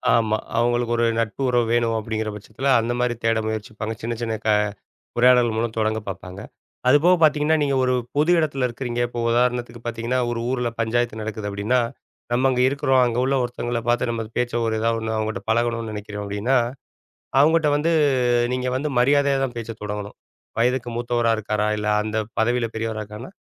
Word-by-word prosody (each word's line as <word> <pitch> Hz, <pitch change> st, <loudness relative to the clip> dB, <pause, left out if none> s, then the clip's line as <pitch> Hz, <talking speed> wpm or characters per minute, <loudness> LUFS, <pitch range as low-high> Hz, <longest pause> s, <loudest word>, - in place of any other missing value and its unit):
ஆமா. 110 Hz, -1 st, +2 dB, 0.2 s
அவுங்களுக்கு 120 Hz, 0 st, +1 dB
ஒரு 120 Hz, -, +2 dB
நட்பு 115 Hz, +3 st, -2 dB
உறவு 120 Hz, -1 st, +2 dB
வேணும் 115 Hz, -1 st, +2 dB
அப்பிடிங்கிற 110 Hz, 0 st, -3 dB
பட்சத்தில 110 Hz, +6 st, -2 dB
அந்தமாரி 120 Hz, +1 st, 0 dB
தேட 115 Hz, -1 st, +2 dB
முயற்சிப்பாங்க. 110 Hz, 0 st, -4 dB
சின்ன 115 Hz, +1 st, -2 dB
சின்ன 115 Hz, -1 st, -1 dB
க -, -, +2 dB, 0.7 s
உரையாடல் 125 Hz, -2 st, +5 dB
மூலம் 115 Hz, 0 st, -1 dB
தொடங்க 110 Hz, 0 st, +1 dB
பார்ப்பாங்க. 95 Hz, 0 st, -7 dB, 0.5 s
அதுபோக 160 Hz, +7 st, +5 dB
பார்த்தீங்கன்னா, 155 Hz, 0 st, +4 dB
நீங்க 140 Hz, -1 st, +1 dB
ஒரு 130 Hz, 0 st, +2 dB, 0.2 s
பொது 150 Hz, +4 st, +3 dB
இடத்துல 140 Hz, -5 st, 0 dB
இருக்கிறீங்க, 120 Hz, 0 st, -4 dB
இப்ப 120 Hz, 0 st, -5 dB
உதாரணத்துக்கு 120 Hz, 0 st, 0 dB
பார்த்தீங்கன்னா, 120 Hz, +2 st, -2 dB
ஒரு 120 Hz, -1 st, -2 dB
ஊர்ல 125 Hz, -2 st, 0 dB
பஞ்சாயத்து 115 Hz, 0 st, 0 dB
நடக்குது 105 Hz, -1 st, -4 dB
அப்பிடின்னா, 105 Hz, +5 st, +1 dB, 0.5 s
நம்ம 130 Hz, +2 st, +3 dB
அங்க 125 Hz, -1 st, 0 dB
இருக்கிறோம். 135 Hz, -1 st, +2 dB
அங்க 120 Hz, 0 st, -1 dB
உள்ள 135 Hz, +1 st, +1 dB
ஒருத்தவுங்கள 120 Hz, -1 st, -3 dB
பார்த்து 120 Hz, 0 st, +2 dB
நம்ம 115 Hz, -1 st, -2 dB
பேச்ச 120 Hz, 0 st, 0 dB
ஒரு 110 Hz, -, 0 dB
எதாவது 115 Hz, 0 st, +1 dB
ஒண்ணு 110 Hz, 0 st, -3 dB
அவுங்கட்ட 110 Hz, -2 st, -2 dB
பழகணும்ன்னு 115 Hz, -1 st, 0 dB
நினைக்கிறோம் 105 Hz, 0 st, -6 dB
அப்பிடின்னா, 105 Hz, +6 st, 0 dB, 0.8 s
அவுங்கட்ட 155 Hz, +1 st, +4 dB
வந்து 160 Hz, +3 st, +1 dB, 0.6 s
நீங்க 125 Hz, 0 st, -1 dB
வந்து 145 Hz, +3 st, -1 dB
மரியாதையா 140 Hz, +2 st, +3 dB
தான் 125 Hz, -3 st, -3 dB
பேச 115 Hz, -1 st, -6 dB
தொடங்கணும். 105 Hz, 0 st, -5 dB, 0.4 s
வயதுக்கு 120 Hz, +1 st, +1 dB
மூத்தவரா 120 Hz, -1 st, +1 dB
இருக்காரா! 105 Hz, 0 st, -1 dB
இல்ல 105 Hz, 0 st, -3 dB, 0.2 s
அந்த 110 Hz, +1 st, -3 dB, 0.2 s
பதவியில 120 Hz, +1 st, +1 dB
பெரியவரா 110 Hz, -1 st, -3 dB
இருக்கானா! 105 Hz, +4 st, -9 dB
120 Hz, 165 wpm, -23 LUFS, 110-125 Hz, 0.8 s, உரையாடல்